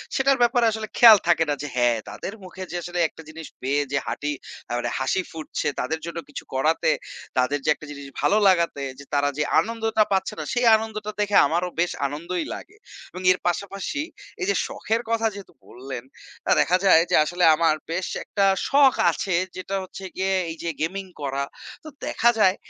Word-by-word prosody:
সেটার 275 0 +3
ব্যাপারে 240 0 +4
আসলে 220 0 -4
খেয়াল 225 -3 +10
থাকে 165 -1 +4
না - - +2
যে 150 - -4
হ্যাঁ 120 -2 +3
তাদের 195 - -6
মুখে 185 +1 -8
যে - - -5
আসলে 175 +1 -4
একটা 160 - -14
জিনিস 160 0 -9
পেয়ে 140 +3 +1
যে 140 - +1
হাটি 150 0 -2 0.4
আ - - -7
মানে 120 0 -2
হাসি 130 +8 0
ফুটছে 160 -1 -4
তাদের 160 0 -2
জন্য 170 0 -6
কিছু 145 - -7
করাতে, 150 +5 +2 0.5
তাদের 130 +3 +2
যে - - +1
একটা 155 - -12
জিনিস 140 -1 -8
ভালো 210 - +3
লাগাতে 170 -6 +2 0.2
যে 140 - -11
তারা 145 0 +2
যে 150 - +1 0.2
আনন্দটা 225 -1 +1
পাচ্ছে 190 +2 0
না - - -3
সেই 245 -1 +1
আনন্দটা 215 -1 -4
দেখে 205 -1 0
আমারও 175 +4 0
বেশ 175 +1 +2 0.2
আনন্দই 170 - -4
লাগে। 425 - -12 0.3
এবং 185 - -8
এর 185 - +2
পাশাপাশি 195 - -2 0.4
এই - - 0
যে - - +2
শখের 225 +1 -2
কথা 225 0 +2
যেহেতু 200 -2 -11
বললেন 125 -1 -8 0.4
তা - - +1
দেখা 180 - +3
যায় 175 -4 +7
যে - - +3
আসলে 175 +2 -1
আমার 165 -1 +3 0.2
বেশ 180 +2 -2 0.2
একটা 200 -1 0 0.2
শখ 275 -1 +6 0.2
আছে 190 +3 -3 0.2
যেটা 185 +1 -4
হচ্ছে 185 +1 -10
গিয়ে 190 0 0 0.2
এই 165 - -6
যে 170 - -1
গেমিং 190 +4 -2 0.2
করা। 140 0 -2 0.4
তো 310 - -11 0.2
দেখা 235 - +2
যায় 190 -2 +5
180 Hz, 195 wpm, -24 LUFS, 150-215 Hz, 0.5 s, খেয়াল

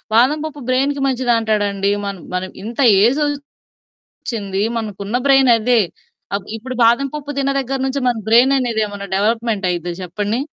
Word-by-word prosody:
బాదం 260 +7 +4
పప్పు 300 -2 -7
బ్రెయిన్‌కి 275 +2 +1
మంచిదంటాడండి. 220 -6 +1
మన 200 0 -3 0.2
మనం 185 +1 -3
ఇంత 230 +4 -7 0.2
ఏజ్ 250 +7 +3 0.9
ఒచ్చింది. 200 -4 -4
మనకున్న 210 -1 -4
బ్రెయిన్ 270 -2 +5
అదే. 235 +2 +2 0.6
ఆహ్, 200 - -4
ఇప్పుడు 255 +3 -7
బాదం 240 +4 +3
పప్పు 290 -1 -5
తిన్న 275 0 +1
దగ్గర 270 +1 -3
నుంచి 270 +1 -2
మన 240 - -1
బ్రెయిన్ 245 +4 +5
అనేది 235 -4 -1
ఏమన్నా 200 -1 -7
డెవలప్మెంట్ 220 -1 0
అయ్యిద్ద 175 0 -3
చెప్పండి. 205 +6 -2
230 Hz, 150 wpm, -18 LUFS, 205-260 Hz, 0.9 s, బ్రెయిన్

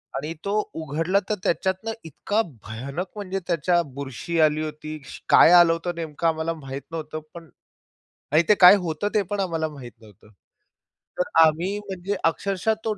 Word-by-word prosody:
आणि 150 +4 -3
तो 200 - -1 0.2
उघडला, 160 +5 0
तर 215 - +1
त्याच्यातनं 190 +5 -1
इतका 205 +7 -1 0.2
भयानक, 135 - -5
म्हणजे 195 -2 -4
त्याच्यात 175 +1 +2
बुरशी 140 +5 -4
आली 155 -1 +3
होती, 155 0 -6
श - - -10
काय - - +7
आलं 175 -1 +7
होतं 170 +1 -4
नेमकं 165 -1 -3
आम्हाला 160 0 0
माहीत 135 -3 -7
नव्हतं, 155 -1 -5
पण 170 -2 -11 0.8
आणि 155 +3 +5
ते 210 - +7
काय 180 +2 +10
होतं, 160 +5 -2
ते 210 - +4
पण 205 - -1
आम्हाला 165 -4 -1
माहीत 135 -5 -10
नव्हतं. 105 -2 -18 0.9
तर 180 - 0 0.2
आम्ही 170 +6 0
म्हणजे 195 -1 -4
अक्षरशः 195 +5 0
तो 220 - +1
165 Hz, 160 wpm, -24 LUFS, 155-185 Hz, 0.9 s, काय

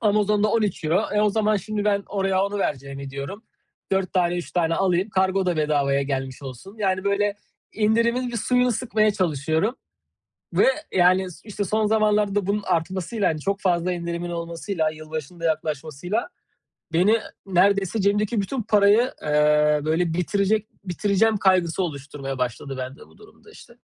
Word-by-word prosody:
Amazon'da 210 -1 +2
€13 200 -4 +1
eee, 210 - +2
o 210 -1 +3
zaman 215 0 +2
şimdi 210 +2 -3
ben 200 -1 +2
oraya 195 -1 +1
onu 200 0 -3
vereceğimi 140 -4 -3
diyorum, 140 - -6 0.5
4 190 -2 0
tane 175 -1 +1
3 175 - -6
tane 165 -2 +1
alayım 190 +2 +1
kargo 190 0 +1
da 175 -2 +1
bedavaya 140 -2 +1
gelmiş 135 -1 -4
olsun. 135 - -9
Yani, 190 -2 0
böyle, 200 0 +1 0.4
indirimin 230 +3 +1
bir 240 - -4
suyunu 250 +2 +2
sıkmaya 215 -2 +1
çalışıyorum. 160 - 0 0.8
Ve, - - +4 0.2
yani, 185 +1 +4 0.2
işte, 205 -1 -4
son 215 +3 0
zamanlarda 210 -2 +2
da 200 -2 0
bunun 205 0 0
artmasıyla, 185 +4 -1
hani, 155 -1 -2
çok 200 +5 -2
fazla 180 -1 +1
indirimin 170 0 -4
olmasıyla, 170 0 -2
yılbaşının 155 +1 -7
da 165 - -4
yaklaşmasıyla 155 - -2 0.6
beni 205 +7 +4 0.3
neredeyse 195 +2 +2
cebimdeki 205 +2 +1
bütün 245 +5 -3
parayı, 210 +4 +4
eee, 150 0 +3
böyle, 165 +1 +1
bitirecek 200 +4 0 0.2
bitireceğim 205 +4 +1
kaygısı 185 -2 +2
oluşturmaya 140 -3 -5
başladı 125 +2 -3
bende 130 +2 -7
bu - - -22
durum 420 - -18
da 430 - -16
işte. 235 - -15
190 Hz, 155 wpm, -23 LUFS, 160-210 Hz, 0.8 s, Ve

